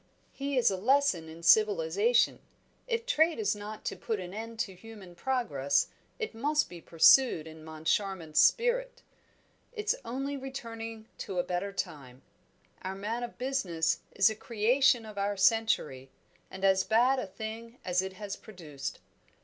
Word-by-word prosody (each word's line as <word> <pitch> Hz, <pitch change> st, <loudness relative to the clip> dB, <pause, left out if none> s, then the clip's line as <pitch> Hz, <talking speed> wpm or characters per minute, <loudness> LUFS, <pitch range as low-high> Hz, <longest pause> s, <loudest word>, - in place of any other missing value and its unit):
"He 275 Hz, 0 st, -3 dB
is 245 Hz, -, +4 dB
a 190 Hz, -, -2 dB
lesson 225 Hz, -, +2 dB
in 165 Hz, +1 st, -11 dB
civilisation. 205 Hz, +4 st, +4 dB, 0.5 s
If 460 Hz, -1 st, -1 dB
trade 330 Hz, -9 st, +3 dB
is 425 Hz, -, 0 dB
not 210 Hz, +1 st, -8 dB
to -, -, -2 dB
put 220 Hz, -3 st, -3 dB
an 180 Hz, 0 st, -7 dB
end 225 Hz, +2 st, -6 dB
to 200 Hz, -6 st, -3 dB
human 200 Hz, -2 st, -12 dB
progress, 150 Hz, -, 0 dB, 0.3 s
it 445 Hz, -2 st, -4 dB
must 295 Hz, +6 st, +1 dB
be 175 Hz, -1 st, -10 dB
pursued 165 Hz, -, +5 dB
in 160 Hz, 0 st, -11 dB
Moncharmont's 160 Hz, +1 st, -1 dB
spirit. -, -, +2 dB, 0.7 s
It's 430 Hz, -2 st, 0 dB
only 275 Hz, +4 st, -3 dB
returning 230 Hz, -4 st, -7 dB
to 195 Hz, -4 st, -5 dB
a 175 Hz, -, +2 dB
better 180 Hz, +2 st, -2 dB
time; 135 Hz, -9 st, -6 dB, 0.6 s
our 190 Hz, +1 st, -4 dB
man 215 Hz, +5 st, -3 dB
of 240 Hz, -1 st, -6 dB
business 200 Hz, -12 st, 0 dB, 0.2 s
is 195 Hz, -, +5 dB
a -, -, -5 dB
creation 235 Hz, +3 st, +2 dB
of 210 Hz, -2 st, -7 dB
our 200 Hz, 0 st, -1 dB
century, 190 Hz, -, +2 dB, 0.4 s
and 190 Hz, +1 st, -4 dB
as 190 Hz, 0 st, +4 dB
bad 245 Hz, +4 st, +3 dB
a 250 Hz, -, -4 dB
thing 225 Hz, +4 st, -7 dB
as 180 Hz, -1 st, +2 dB
it 190 Hz, 0 st, -5 dB
has 200 Hz, +1 st, -6 dB
produced. 155 Hz, -10 st, -8 dB
215 Hz, 155 wpm, -30 LUFS, 180-250 Hz, 0.7 s, pursued